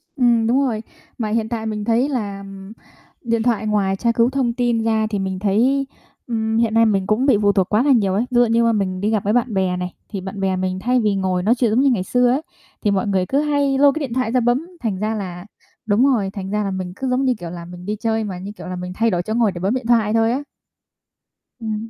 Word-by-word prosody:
Ừm, 235 -4 +3
đúng 265 +4 +3
rồi. 225 -4 -2 0.3
Mà 220 -3 -2
hiện 220 0 -1
tại 225 -2 -3
mình 210 -1 -3
thấy 235 +5 +2
là 205 -7 -3 0.8
điện 230 -2 0
thoại 220 -3 0
ngoài 200 -2 +1
tra 235 +4 +1
cứu 230 +1 +3
thông 260 -3 0
tin 240 -2 0
ra 220 -1 +1
thì 205 -2 -2
mình 190 -1 -3
thấy, 245 +8 +2 0.4
ừm, 220 -2 -1
hiện 230 -1 +1
nay 225 0 +5
mình 195 -3 +1
cũng 215 +5 +1
bị 270 -6 +4
phụ 205 -1 +4
thuộc 190 -2 +1
quá 215 +3 +2
là 285 - +3
nhiều 205 -7 +3
ấy. 215 +5 +1
Ví - - -3
dụ 245 - +5
như 230 +1 +2
mà 230 - +3
mình 185 -3 -1
đi 205 - +1
gặp 215 -3 0
với 205 - +1
bạn 245 -2 +1
bè 185 -2 0
này, 180 0 -4 0.2
thì 200 -3 -5
bạn 190 +2 -7
bè 190 -1 0
mình 185 0 -2
thay 250 +5 +1
vì 210 -3 +1
ngồi 185 -2 -1
nói 225 +5 +3
chuyện 235 -3 +1
giống 225 - +2
như 275 - +4
ngày 225 -8 +1
xưa 245 +5 +2
ấy, 270 +4 +1 0.4
thì 205 - +1
mọi 195 +1 0
người 190 -2 +1
cứ 275 +8 0
hay 285 -2 +1
lôi 285 +1 +6
cái - - -2
điện 270 -6 -4
thoại 250 -2 0
ra 255 - +3
bấm, 245 +7 +1
thành 220 -5 -1
ra 215 +3 -1
là 180 -3 -6 0.4
đúng 220 +4 +3
rồi, 230 -8 +2
thành 190 -2 -5
ra 210 0 0
là 195 - -2
mình 185 -1 -4
cứ 265 +4 -3
giống 255 +2 +1
như, 255 - +3
kiểu 175 - -6
là, 170 0 -8
mình 180 +1 -10
đi 210 +2 -2
chơi 220 +1 -1
mà, 190 -4 -5
như 195 +3 -7
kiểu 210 - -10
là, 185 - -4
mình 180 0 -6
thay 230 +2 +2
đổi 175 - 0
chỗ 215 - -3
ngồi 225 -3 +2
để 175 - -7
bấm 195 +5 0
điện 255 -3 -3
thoại 225 -3 +3
thôi 225 0 +3
á. 270 +4 -2 1.2
Ừm. 220 0 -4
220 Hz, 275 wpm, -20 LUFS, 195-240 Hz, 1.2 s, lôi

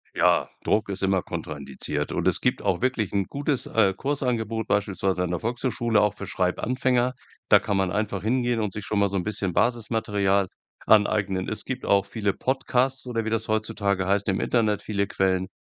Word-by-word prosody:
Ja, - - +3
Druck 105 -1 +1
ist 100 0 -3
immer 95 -1 +2
kontraindiziert. 75 0 -4
Und - - -1
es - - +2
gibt - - +1
auch 95 -1 0
wirklich 125 -6 0
'n 100 -1 +1
gutes, 140 - -2
äh, 100 -4 +3
Kursangebot 115 -4 -2
beispielsweise 95 -2 0
an 90 - -2
der 90 -1 -1
Volkshochschule, 120 -1 0
auch 105 0 +1
für 100 - -7
Schreibanfänger. 125 +7 0 0.4
Da - - +8
kann 100 - -1
man 95 -2 +1
einfach 100 -1 -2
hingehen 120 0 +1
und 105 -3 -2
sich 105 - -6
schon 105 - -1
mal 100 -1 +3
so 100 - -2
'n 90 - -1
bisschen 100 -3 0
Basismaterial 105 -4 +1 0.4
aneignen. 100 -3 +3
Es 110 - -2
gibt 130 -1 -5
auch 100 0 +3
viele 100 -3 -1
Podcasts 130 +1 0
oder 115 -2 -2
wie - - -1
das 115 +1 -1
heutzutage 100 -3 0
heißt 100 +1 +1
im 95 - 0
Internet, 110 -4 +1
viele 100 -2 -1
Quellen, 95 -1 0
105 Hz, 190 wpm, -25 LUFS, 95-115 Hz, 0.4 s, Da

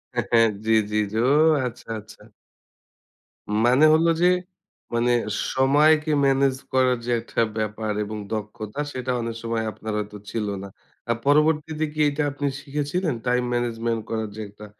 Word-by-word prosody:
হ্যা, - - +2
হ্যা। 115 - +5 0.3
জি, 110 - +1 0.2
জি। 105 - -1 0.3
ওহ! 145 +1 +4
আচ্ছা, 120 - -11
আচ্ছা। 105 0 -15 1.4
মানে 130 +5 +5
হলো 165 +2 +4
যে 180 - +6 0.7
মানে 120 +1 +2 0.4
সময়কে 150 +4 +4
ম্যানেজ 135 -1 +3 0.2
করার 130 -1 +3
যে 120 - -2
একটা 115 - -2 0.2
ব্যাপার 110 0 -2
এবং 105 +1 -6 0.2
দক্ষতা, 110 +3 -5
সেটা 130 0 -3
অনেক 115 0 -4
সময় 115 -1 -1
আপনার 110 0 -6
হয়তো 105 0 -6
ছিল 110 -2 -2 0.2
না। 100 - -6 0.4
আর 120 - +2
পরবর্তীতে 150 +1 +2
কি 155 - -7
এটা 145 +1 -1
আপনি 145 +1 -2
শিখেছিলেন? 150 +4 -2
time 125 0 +1
management 115 -1 -1
করার 110 -1 -2
যে - - -8
একটা 105 +1 -12
125 Hz, 150 wpm, -24 LUFS, 110-145 Hz, 1.4 s, যে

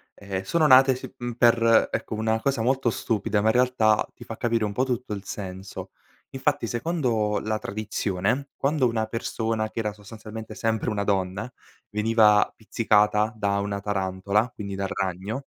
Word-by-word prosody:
ehm, 95 -2 -4
sono 155 +12 +1
nate, 130 -1 +7
sì, 130 - -9
mhmm, 120 -1 -5
per 115 -1 +4
ecco, - - -3
una 110 +1 0
cosa 135 -3 0
molto 130 0 +2
stupida, 105 -2 -1
ma 110 +2 +3
in - - +3
realtà 125 -4 +3
ti - - -11
fa - - -7
capire 115 -2 0
un 105 - -3
po' 125 - +1
tutto 125 -3 -2
il 100 -2 -6
senso: 95 0 -7 0.4
infatti 145 0 0
secondo 120 -5 0
la 110 0 -2
tradizione, 105 +4 -2
quando 140 -1 +2
una 115 -2 -1
persona 110 -1 -2
che - - -20
era 105 -2 -1
sostanzialmente 110 +1 -9
sempre 110 +1 -1
una 105 -2 -1
donna, 95 +1 -1 0.4
veniva 105 -1 +4
pizzicata 105 -1 +2
da 100 -1 0
una 100 0 -2
tarantola, 100 +2 0
quindi 100 -3 -7
dal 95 0 -3
ragno 95 +7 -3
110 Hz, 165 wpm, -25 LUFS, 100-120 Hz, 0.4 s, nate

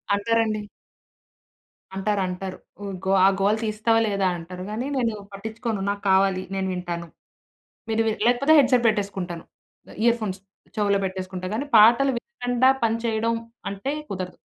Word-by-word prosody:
అంటారండి. 220 0 0 1.3
అంటారు 200 +1 0
అంటారు. 185 +1 -5 0.3
ఉ - - -5 0.2
గో 190 - +1
"ఆ - - +8
గోల 205 +2 +3
తీస్తావా 220 +1 +2
లేదా" 200 -2 +1
అంటారు 180 +2 -8
గానీ 235 +5 -3
నేను 235 -3 +1 0.2
పట్టించుకోను 220 +1 -4
నాకు 200 0 -2
కావాలి 190 -1 +3
నేను 190 0 -1
వింటాను. 175 -1 -4 0.8
మీరు 225 0 +1
వి 220 - +2
లేకపోతే 245 +5 +4
హెడ్సెట్ 255 -3 +4
పెట్టేసుకుంటాను 195 -5 -2 0.6
ఇయర్‌ఫోన్స్ 220 -5 +1 0.4
చెవులో 200 -2 +2
పెట్టేసుకుంటా. 185 -1 -4
కానీ 265 +6 -2
పాటలు 235 +6 +7
వినకుండా 245 -3 +1
పని 225 0 +2
చేయడం 230 0 +1 0.4
అంటే 200 +7 -4 0.2
కుదరదు. 185 -2 -5
210 Hz, 130 wpm, -24 LUFS, 190-230 Hz, 1.3 s, ఆ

